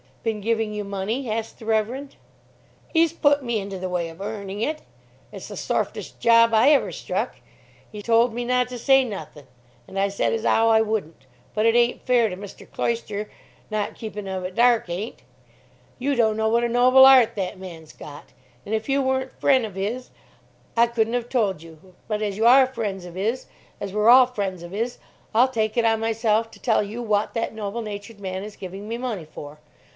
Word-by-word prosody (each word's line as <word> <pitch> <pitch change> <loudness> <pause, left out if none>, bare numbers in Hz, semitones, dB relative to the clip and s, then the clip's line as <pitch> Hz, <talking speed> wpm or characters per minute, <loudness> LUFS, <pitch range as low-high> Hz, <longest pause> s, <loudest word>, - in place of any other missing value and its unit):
"Been 220 -2 -2
giving 225 0 0
you 210 0 -3
money?" 205 +6 -3
asked 225 +1 -3
the 225 - -11
Reverend. 225 +6 -1 0.8
"'E's 330 -1 +4
put 285 -3 +2
me 235 -3 -1
into 195 -1 -6
the 185 0 -4
way 175 -2 -2
of 165 +3 -12
earning 200 -1 -5
it. 305 +6 -2 0.5
It's - - -9
the - - -8
sorfest - - -3
job 230 0 +5
ever 270 +6 +5
I - - -6
struck. - - -3 0.6
'E 210 - -7
told 230 +1 +3
me 240 +1 -3
not 250 0 +1
to 250 - -6
say 270 +2 +5
nothin', 155 - -8 0.4
and 195 - -5
I 200 +1 +2
said 200 - 0
as 225 0 -2
'ow 225 0 +4
I 220 0 +5
wouldn't. 215 -7 -3 0.3
But 215 +1 +1
it 230 0 +4
ain't 240 0 +2
fair 245 -3 +3
to 180 - -6
Mr. 200 0 -11
Cloyster, 215 -3 -3 0.4
not 210 -1 -2
keeping 210 -2 -7
of 190 -1 -4
it 180 +1 -5
dark 240 -5 +3
ain't. 190 +7 -5 0.8
Yew 280 +2 0
don't 220 -3 +2
know 220 0 +1
what 235 +1 +2
a 240 - +1
noble 255 +2 +6
'eart 255 -4 +7
that 190 -2 -4
man's 165 -4 -10
got, 145 -1 -11 0.4
an' 210 - -5
if 220 +3 -2
you 275 +1 +2
weren't 260 0 -2
fren' 260 -4 +3
of 200 -3 -9
'is 225 +6 -3 0.7
I 235 - +6
couldn't 230 -1 0
have 245 -1 -2
told 205 - 0
you. 165 +3 -16
But 215 -1 -2
as 200 -2 -2
you 225 - +1
are 260 +2 +8
fren's 210 -7 -4
of 175 0 -10
'is, 225 +7 -2 0.3
as 200 - -5
we're 210 +2 +3
all 255 +1 +8
fren's 200 -7 -4
of 175 +2 -9
'is, 230 +4 -2 0.4
I'll 240 +4 +5
take 220 -2 -1
it 235 - +3
on 225 -1 +3
myself 225 0 +1
to - - -15
tell 225 -4 +2
you 215 +4 -6
wot 210 -2 0
that 230 -1 -2
noble 220 +1 -4
natured 205 0 -8
man 190 -1 -5
is 210 0 -9
giving 195 +2 -8
me 230 +1 -3
money 225 -10 -4
for. 150 -1 -10
220 Hz, 205 wpm, -23 LUFS, 200-240 Hz, 0.8 s, are